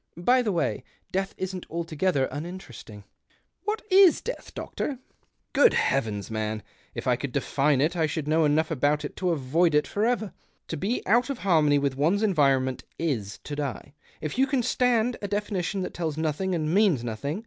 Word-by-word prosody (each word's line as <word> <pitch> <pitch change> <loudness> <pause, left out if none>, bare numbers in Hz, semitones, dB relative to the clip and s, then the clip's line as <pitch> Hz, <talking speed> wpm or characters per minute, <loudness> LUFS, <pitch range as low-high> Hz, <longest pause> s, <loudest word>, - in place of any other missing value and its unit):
By 245 +9 +3
the 220 -4 0
way, 175 - -1 0.3
death 195 +1 -2
isn't 185 -1 -5
altogether 165 -3 0
uninteresting." 145 - -8 0.3
" - - -42
"What 425 +1 -2
is 375 -2 +7
death, - - -7
doctor? 280 - -4 0.2
" - - -43
" - - -49
Grood 480 - +6
heavens, 110 -7 0
man! 110 0 -2 0.3
if - - -5
I - - +3
could - - -5
define 140 -1 +1
it, 160 +5 +1
I 160 -2 +2
should 150 0 -3
know 160 +1 +3
enough 155 +2 +2
about 150 +1 +1
it - - -7
to 185 - 0
avoid 160 +2 +2
it 150 -1 +3
for 205 +9 -2
ever. 225 -3 0 0.4
To - - -2
be 205 - -2
out 240 +7 +3
of 275 - -2
harmony 155 -6 +4
with 140 -2 -1
one's 175 +9 +2
environment 135 -9 +2
is 115 -11 -2
to 145 - -5
die, 140 -2 -5 0.3
if 155 - -4
you 270 - +4
can 260 -2 +1
stand 245 -1 +2
a 205 - -3
definition 200 -2 -2
that - - -5
tells 160 -3 -3
nothing 160 +4 -1
and 155 -1 -1
means 190 - +3
nothing. 120 - -3
165 Hz, 190 wpm, -26 LUFS, 145-200 Hz, 0.4 s, is